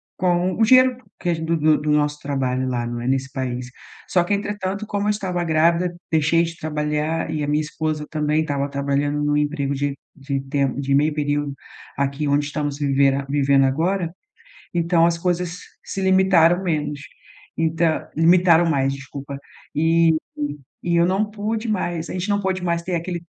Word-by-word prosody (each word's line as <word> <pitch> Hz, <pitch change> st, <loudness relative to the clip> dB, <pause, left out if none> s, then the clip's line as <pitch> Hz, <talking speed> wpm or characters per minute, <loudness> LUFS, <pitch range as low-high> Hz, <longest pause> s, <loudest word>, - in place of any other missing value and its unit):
com 180 Hz, 0 st, +1 dB
o 225 Hz, -, +2 dB
dinheiro 255 Hz, +2 st, +6 dB, 0.2 s
que 175 Hz, -, -2 dB
é -, -, +3 dB
gen 160 Hz, 0 st, -5 dB
do 165 Hz, 0 st, +1 dB
do 155 Hz, 0 st, +4 dB
do 150 Hz, -, 0 dB
nosso 150 Hz, 0 st, +1 dB
trabalho 130 Hz, -2 st, -1 dB
lá, 120 Hz, -2 st, -2 dB
não 120 Hz, 0 st, -4 dB
é, 120 Hz, -, -4 dB
nesse 135 Hz, 0 st, 0 dB
país. 125 Hz, -2 st, -4 dB, 0.4 s
Só 175 Hz, -2 st, +2 dB
que 190 Hz, -, -1 dB
entretanto, 200 Hz, 0 st, -3 dB
como 205 Hz, 0 st, -1 dB
eu -, -, +3 dB
estava 185 Hz, -4 st, -1 dB
grávida, 170 Hz, +2 st, +2 dB, 0.2 s
deixei 160 Hz, +1 st, +3 dB
de 165 Hz, 0 st, -4 dB
trabalhar 150 Hz, +1 st, -2 dB
e 155 Hz, -1 st, -2 dB
a -, -, -2 dB
minha 150 Hz, +1 st, +1 dB
esposa 155 Hz, 0 st, -3 dB
também 150 Hz, 0 st, 0 dB
estava 145 Hz, -2 st, -2 dB
trabalhando 140 Hz, +1 st, -1 dB
num 145 Hz, 0 st, +1 dB
emprego 145 Hz, -1 st, 0 dB
de 140 Hz, 0 st, -2 dB, 0.2 s
de 140 Hz, -1 st, -3 dB
temp 135 Hz, -1 st, -1 dB
de 140 Hz, 0 st, -1 dB
meio 150 Hz, +2 st, +3 dB
período 145 Hz, -1 st, -1 dB, 0.4 s
aqui 140 Hz, +2 st, -1 dB
onde 145 Hz, +1 st, +2 dB
estamos 145 Hz, -1 st, -3 dB
vivera 140 Hz, -1 st, +2 dB
vivendo 140 Hz, -1 st, +3 dB
agora, 165 Hz, +5 st, 0 dB, 0.6 s
então 170 Hz, 0 st, +3 dB
as 170 Hz, -, +1 dB
coisas 180 Hz, 0 st, -2 dB, 0.2 s
se 195 Hz, -, -5 dB
limitaram 190 Hz, -2 st, +4 dB
menos, 150 Hz, -4 st, -2 dB, 0.6 s
então 165 Hz, 0 st, 0 dB
limitaram 170 Hz, +1 st, +5 dB
mais, 135 Hz, -2 st, +1 dB
desculpa. 140 Hz, +1 st, -8 dB, 0.4 s
Eh, 165 Hz, +1 st, +4 dB, 0.7 s
e 175 Hz, -, 0 dB
eu 170 Hz, 0 st, +4 dB
não 195 Hz, +3 st, +1 dB
pude 215 Hz, +2 st, -3 dB
mais, 175 Hz, -5 st, -2 dB
a -, -, -4 dB
gente 185 Hz, +2 st, -3 dB
não 205 Hz, 0 st, +1 dB
pôde 190 Hz, -1 st, -2 dB
mais 170 Hz, -1 st, 0 dB
ter 180 Hz, +1 st, -3 dB
aquele 170 Hz, 0 st, -3 dB
155 Hz, 180 wpm, -22 LUFS, 140-175 Hz, 0.7 s, dinheiro